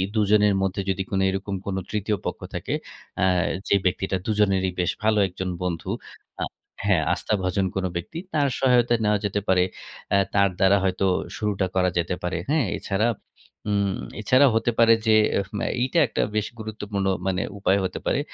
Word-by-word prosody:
দুজনের 105 -1 +4
মধ্যে 95 +1 -1
যদি 95 0 0
কোনো 95 -1 +1
এরকম 95 +1 -3
কোন 100 - -2 0.2
তৃতীয় 105 0 -1
পক্ষ - - -3 0.2
থাকে, - - -3 0.5
আ - - +5 0.4
যে - - +4
ব্যক্তিটা 95 +1 0
দুজনেরই 95 -3 +2
বেশ 90 - +2
ভালো 110 -1 +3
একজন 95 0 -5
বন্ধু। 85 -2 -3 0.5
আ - - +1 0.4
হ্যাঁ 90 -5 +3
আস্থাভাজন 95 -2 0
কোন 95 -1 -1
ব্যক্তি, 85 - -5 0.2
তার 145 -2 +3
সহায়তা 125 -2 +4
নেওয়া 105 0 +2
যেতে 105 0 0
পারে। 95 -1 +4 0.5
অ্যা 100 - +4 0.2
তার 100 -1 +5
দ্বারা 95 +1 +5
হয়তো 95 0 +1 0.3
শুরুটা 100 -3 0
করা 90 0 +3
যেতে 85 +1 0
পারে, 90 -1 -1
হ্যাঁ? 150 -3 +2
এছাড়া 105 +3 0 0.6
উম 100 -2 +1 0.3
এছাড়াও 130 +5 +5
হতে 115 +1 +2
পারে 115 0 +7
যে 110 - +6 0.2
এহ 100 - -1
ম - - -2 0.2
এইটা 130 +7 +2
একটা 110 - -1
বেশ 105 -1 +1
গুরুত্বপূর্ণ 105 -2 -4 0.2
মানে 95 0 0 0.2
উপায় 100 0 +2
হতে - - -4
পারে। - - +1
100 Hz, 170 wpm, -24 LUFS, 95-110 Hz, 0.6 s, পারে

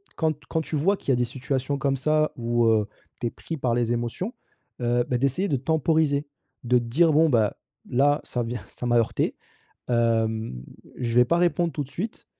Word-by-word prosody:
quand 155 -2 0
quand 160 - -1
tu 160 - -5
vois, 190 +8 +3
qu'il - - -8
y - - +5
a - - +4
des 120 - +2
situations 135 +2 -2
comme 135 0 0
ça 155 +3 +2
où, 120 0 +1
heu, 110 -2 +3 0.3
tu 120 - 0
es - - -4
pris 165 - -6
par 125 -4 0
les 120 -1 +1
émotions, 120 - -3 0.5
heu, 120 0 +2
bah, 125 - +1
d'essayer 140 +10 +1
de 140 - +1
temporiser? 155 +1 +1 0.4
De 125 0 +3
te - - -5
dire: 155 +7 +3
«Bon 160 +2 +5
bah, 110 -6 +2 0.3
là 145 +4 +3
ça 125 - -3
vient, 120 +1 -5
ça - - -8
m'a 120 0 +3
heurtée, 115 - +1 0.5
hem, 115 - 0 0.3
je 120 -2 -2
vais 125 0 +6
pas 170 - +2
répondre 175 -1 +2
tout 145 - -2
de - - -18
suite, 205 +9 -5
130 Hz, 210 wpm, -25 LUFS, 120-155 Hz, 0.5 s, vais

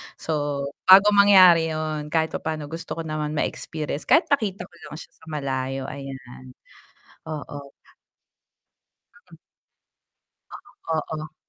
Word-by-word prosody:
So, 160 - -6 0.6
bago 195 +2 +8
mangyari 185 -5 +6
'yon, 155 -1 -4
kahit 160 +1 0
papaano, 155 -1 -5
gusto 165 +1 -6
ko 165 - -5
naman 155 -1 -4
ma-experience. 150 0 -4
Kahit 330 -2 +3
makita 200 -9 0
ko 175 - -16
lang 150 - -9
siya 160 - -11
sa - - -19
malayo 135 -3 -3
ayan, 130 -2 -10 0.8
oo. 145 -2 -7 1.6
Mm. - - -14 1.1
Ganun, - - -14 0.4
oo. 155 0 -11
155 Hz, 115 wpm, -23 LUFS, 145-170 Hz, 1.6 s, bago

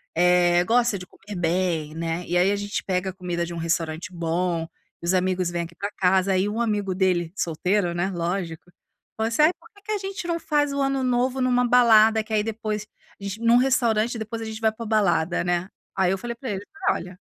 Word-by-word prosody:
eh, 175 0 +4
gosta 235 -1 +2
de 180 - -8
comer 205 +1 -11
bem, 170 -3 0
né. 165 +1 -3
E 175 - +1
aí 185 +3 +4
a - - +1
gente 205 0 -3
pega 185 0 -1
a - - -17
comida 175 -2 -3
de 170 - -7
um - - -6
restaurante 165 +1 -2
bom, 170 0 -1 0.4
e - - -7
os 175 - +2
amigos 185 -1 +1
vêm 170 0 -2
aqui 170 0 -10
pra 200 +3 -4
casa. 190 +1 +3
Aí 185 +2 +2
um 225 +3 -2
amigo 205 -4 -1
dele, 180 -3 +1
solteiro 175 +2 0
né 175 +3 -1
lógico, 175 -1 -4 0.5
falou 220 0 0
assim: 235 - +1
"Ai, 320 - +6
porque 450 - -20
que 430 - -5
a - - +1
gente 390 -2 -5
não 335 -1 -1
faz 295 -3 +1
o 280 - -1
ano 270 -1 0
novo 255 +1 +1
numa 250 -1 +2
balada, 225 -3 +5
que 220 - -15
aí 215 - +3
depois, 215 -1 -4 0.3
agent 200 +2 -5
num 235 +1 +5
restaurante 235 -3 +2
depois 220 +1 -5
a 225 - -4
gente 220 0 -6
vai 220 0 +3
pra 230 +1 -8
balada, 175 -7 +1
né?" 175 +1 0 0.3
Aí 190 -1 +2
eu 195 - 0
falei 235 +3 -5
para 235 -1 -5
ele: 195 0 -4 0.3
"Olha" 180 +1 -5
195 Hz, 220 wpm, -24 LUFS, 175-230 Hz, 0.5 s, Ai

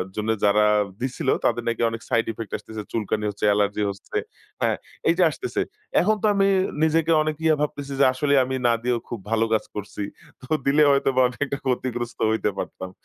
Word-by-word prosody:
জন্য 105 +1 -2 0.2
যারা 105 +1 +4 0.4
দিছিল 130 +2 -2 0.2
তাদের 120 0 +1
নাকি 115 0 -1
অনেক 115 0 -6
সাইড 115 - +2
ইফেক্ট 110 -1 -7
আসতেছে। 105 +1 -8
চুলকানি 105 -1 -1
হচ্ছে, 105 +1 -3
অ্যালার্জি 105 0 +2
হচ্ছে। 100 0 -6 0.4
হ্যাঁ - - +2 0.3
এই - - +5
যে 185 - +5
আসতেছে। 375 - -3 0.4
এখন 215 +4 +3
তো - - +3
আমি 195 0 +3 0.4
নিজেকে 160 +1 +2
অনেক 155 0 -1
ইয়ে 160 -1 +4
ভাবতেছি 140 -2 -3
যে 140 - +6
আসলে 140 +2 0
আমি 130 +1 -3
না 120 - +4
দিয়েও 120 -1 +1
খুব 120 - -4
ভালো 115 0 +3
কাজ 110 - +2
করছি। 105 0 -5 0.4
তো 130 - -13 0.2
দিলে 145 +2 +4
হয়তোবা 135 -2 +2
আমি 120 - -9
একটা 140 0 -3
ক্ষতিগ্রস্ত 120 -2 -2
হইতে 110 -1 +1
পারতাম। 95 - -5
120 Hz, 190 wpm, -24 LUFS, 105-140 Hz, 0.4 s, যে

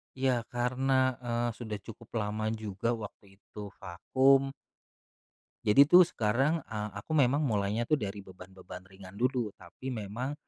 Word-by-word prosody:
Iya, 135 0 +2 0.2
karena, 125 +2 0 0.3
eee, 120 0 0
sudah 110 -3 -5
cukup 115 0 -11
lama 105 +1 -2 0.2
juga 105 +1 -2
waktu 105 - -10
itu 105 +1 -12 0.2
vakum. 135 +9 +2 1.1
Jadi 140 +7 +7
tuh 180 +2 +9
sekarang, 135 +4 +1
eee, 105 -1 -4
aku 100 - -10
memang 140 +1 +4
mulainya 110 -3 0
tuh 155 - +4
dari 100 -4 -5
beban-beban 95 -1 -12
ringan 95 0 -13
dulu. 125 -2 0
Tapi 95 +8 -9
memang, 115 +5 -4
115 Hz, 135 wpm, -30 LUFS, 100-130 Hz, 1.1 s, tuh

